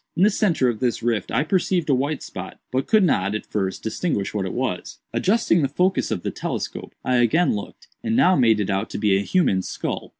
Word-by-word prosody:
In 180 - +4
the 210 - +5
centre 170 -11 +2
of 115 -3 -1
this 125 -3 -1
rift 115 -5 0
I 130 +5 +1
perceived 180 0 0
a 145 - +3
white 140 +3 -1
spot, - - -8
but 130 +1 -1
could 215 -2 +4
not, 100 - +1
at 110 - -4
first, 95 -2 -3
distinguish 110 - -2
what 100 -3 -1
it - - -5
was. - - -3 0.2
Adjusting 195 -4 +2
the 140 - +2
focus 180 +6 +1
of 85 - -3
the - - -2
telescope, - - -5
I 125 -1 +2
again 120 +9 +3
looked, 100 - -8 0.2
and 225 0 0
now 185 -7 +5
made 115 -5 +4
it 105 -1 -1
out 95 0 -1
to - - -5
be 105 -2 +2
a 95 - +2
human 115 - +2
skull. - - -4
130 Hz, 230 wpm, -23 LUFS, -, 0.2 s, the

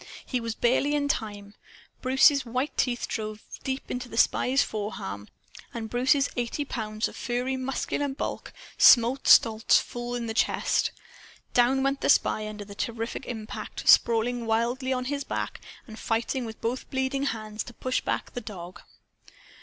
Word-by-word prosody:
He 255 - -1
was 230 -1 -3
barely 265 +4 +2
in 285 -1 0
time. 205 -7 -3 0.5
Bruce's 265 +2 +5
white 255 +4 -2
teeth 245 -2 0
drove 215 -1 -5 0.2
deep 265 0 -4
into 250 0 -4
the 225 - -8
spy's 260 +3 +3
forearm, 105 - -5 0.5
and 220 -2 -5
Bruce's 265 +3 +3
eighty 245 +4 -2
pounds 215 -4 -2
of - - -11
furry 250 +2 -2
muscular 265 +2 -2
bulk 270 0 -5 0.3
smote 245 +3 +6
Stolz 220 -1 +6
full 240 0 -5
in 240 -1 -3
the 225 - -3
chest. - - +1 0.6
Down 255 +2 +3
went 275 0 0
the - - 0
spy, 215 0 +3
under 210 -1 -7
the 200 - -10
terrific 230 +4 -4
impact, 220 -3 -6
sprawling 235 +1 +4
wildly 240 +4 0
on 255 -1 -1
his 285 +1 -2
back, - - -4 0.2
and 220 -3 -11
fighting 235 +3 -1
with 220 -1 -8
both 240 +3 -3
bleeding 265 +1 -1
hands 215 -4 -3
to 240 - -10
push 255 0 -1
back - - -3
the 245 - -4
dog. 185 -5 -9
240 Hz, 160 wpm, -27 LUFS, 220-265 Hz, 0.6 s, smote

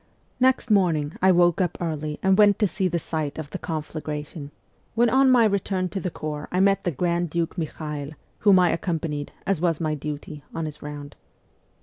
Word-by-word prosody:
Next 255 -2 +2
morning 165 -7 +2
I 190 +1 +6
woke 175 0 +4
up 175 -2 -1
early 155 -3 -3
and 190 0 +4
went 205 -1 +5
to 215 - +2
see 190 0 0
the 175 -1 -1
190 - - -7
site 155 -3 -2
of 155 -2 -6
the - - -5
conflagration, 150 -2 -5 0.5
when 235 0 +3
on 265 0 +5
my 245 -3 +6
return 195 -2 0
to 195 - -3
the 180 - -2
corps 150 -2 -5
I 180 - 0
met 195 0 +3
the - - +2
Grand 170 +3 0
Duke 165 +1 -2
Michael, 150 -2 -5 0.3
whom 200 -3 +6
I 180 -2 +4
accompanied, 160 -4 -2
as 190 -4 0
was 170 -3 +1
my 155 -2 0
duty, 150 0 -6
on 165 - -2
his 150 -1 -7
round. 145 -1 -8
170 Hz, 200 wpm, -24 LUFS, 150-190 Hz, 0.5 s, I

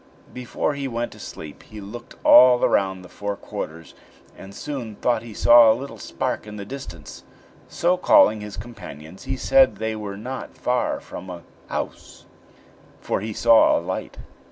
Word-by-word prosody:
Before 125 +4 -2
he 140 -1 -4
went 120 -1 -3
to - - -14
sleep 75 -2 -9
he 110 - -12
looked 110 +4 -10
all 125 0 +8
round 95 -2 0
the - - -11
four 100 +2 -5
quarters, 80 -4 -8 0.4
and 95 - -12
soon 125 -7 -6
thought 120 +3 0
he 115 -3 -11
saw 120 -1 +7
a 110 - +1
little 140 +2 -8
spark - - -4
in 105 - -8
the 100 -1 -7
distance; 90 - -9 0.4
so, 180 +2 +1
calling 110 -10 +5
his 105 -1 -8
companions, 95 -7 -10
he 130 - -3
said 270 - +4
they 110 0 -3
were 100 -2 -6
not 125 +5 -7
far 125 0 -1
from 95 +1 -10
a 85 -2 -8 0.2
house, - - -6 0.7
for - - -2
he 110 +2 -4
saw 115 +1 +5
a - - 0
light. - - -5
110 Hz, 170 wpm, -23 LUFS, 100-125 Hz, 0.7 s, all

